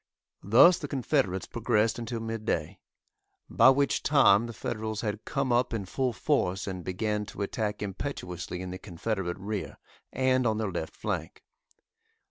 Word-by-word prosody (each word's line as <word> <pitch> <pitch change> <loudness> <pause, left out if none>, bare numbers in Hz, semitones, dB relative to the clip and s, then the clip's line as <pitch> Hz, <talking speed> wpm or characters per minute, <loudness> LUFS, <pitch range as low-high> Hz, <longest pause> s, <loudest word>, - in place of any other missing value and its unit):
Thus 130 - +6
the 145 - -5
Confederates 130 - 0
progressed 110 +2 +1
until 115 0 -4
mid 115 -1 -4
day, 85 -2 -2 0.7
by 115 +3 +7
which 140 +1 +2
time 120 -7 +5
the - - -6
Federals 110 -1 -4
had 105 -1 -4
come 135 -3 0
up 120 -1 +2
in 100 -4 -3
full 130 +6 -1
force 100 -9 0
and 95 -2 -5
began 105 +3 -1
to 100 - -5
attack 105 +1 -2
impetuously 90 - -5
in 90 - -6
the 95 - -6
Confederate 95 -1 -3
rear 100 +1 -5 0.3
and 130 -1 +2
on 110 -1 +1
their 110 -3 -2
left 85 -2 -5
flank. - - -4
110 Hz, 155 wpm, -28 LUFS, 95-125 Hz, 0.7 s, by